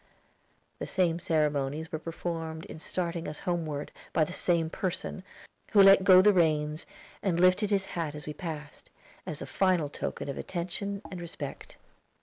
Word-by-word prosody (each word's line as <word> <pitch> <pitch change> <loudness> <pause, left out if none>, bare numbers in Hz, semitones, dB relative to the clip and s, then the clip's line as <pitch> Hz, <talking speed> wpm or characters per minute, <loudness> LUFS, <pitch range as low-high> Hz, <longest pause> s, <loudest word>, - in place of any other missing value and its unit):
The - - -4
same 175 -3 +1
ceremonies 150 -1 0
were 155 - -3
performed 165 0 -4
in 160 - -9
starting 170 0 -2
us 150 - -5
homeward, 160 -5 -2 0.2
by 160 - +4
the 170 - -3
same 170 -3 +1
person, 185 +2 -3 0.5
who 200 -2 +8
let 195 0 +8
go 185 0 +8
the 210 0 +6
reins, 155 -3 +1 0.3
and 175 -4 0
lifted 185 +3 +4
his 195 -2 +1
hat 160 -4 -2
as 150 - -6
we 150 - -4
passed, 150 -2 -7 0.4
as 155 -5 -3
the - - -6
final 180 -6 +1
token - - -4
of 140 - -4
attention 195 +3 -4
and 180 -2 -6
respect. 160 -5 -7
170 Hz, 160 wpm, -29 LUFS, 155-185 Hz, 0.5 s, who